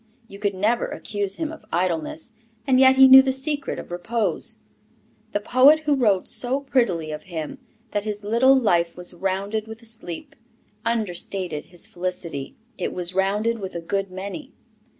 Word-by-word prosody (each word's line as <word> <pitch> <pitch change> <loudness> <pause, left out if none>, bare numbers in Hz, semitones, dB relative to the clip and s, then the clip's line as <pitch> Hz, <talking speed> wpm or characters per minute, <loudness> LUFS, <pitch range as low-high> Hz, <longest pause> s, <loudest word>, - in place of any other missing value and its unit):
You 200 - -12
could 200 -2 -1
never 215 +5 +1
accuse 205 -2 -3
him 315 -2 -3
of 320 - -11
idleness, 170 +3 -2 0.3
and 260 -2 +4
yet 265 0 +7
he 265 0 +8
knew 265 0 +11
the 265 0 0
secret 280 +2 -3
of - - -8
repose. 220 +6 -2 0.7
The 205 - 0
poet 260 +8 +5
who 300 -1 +1
wrote 215 -9 +2
so 255 +3 0
prettily 195 - 0
of 150 0 -5
him 160 -4 -6 0.3
that 205 -1 -1
his 210 -1 -4
little 240 +6 +4
life 170 -8 +1
was 180 0 -2
rounded 195 +4 -2
with 220 0 -9
a - - -9
sleep, 220 -7 -7 0.5
understated 185 -7 -2
his 175 -1 -9
felicity; 175 -6 -5 0.2
it 180 - -2
was 180 0 -3
rounded 205 +5 +1
with 190 -3 -6
a - - -2
good 195 +3 -2
many. 200 +10 -7
205 Hz, 170 wpm, -23 LUFS, 180-245 Hz, 0.7 s, knew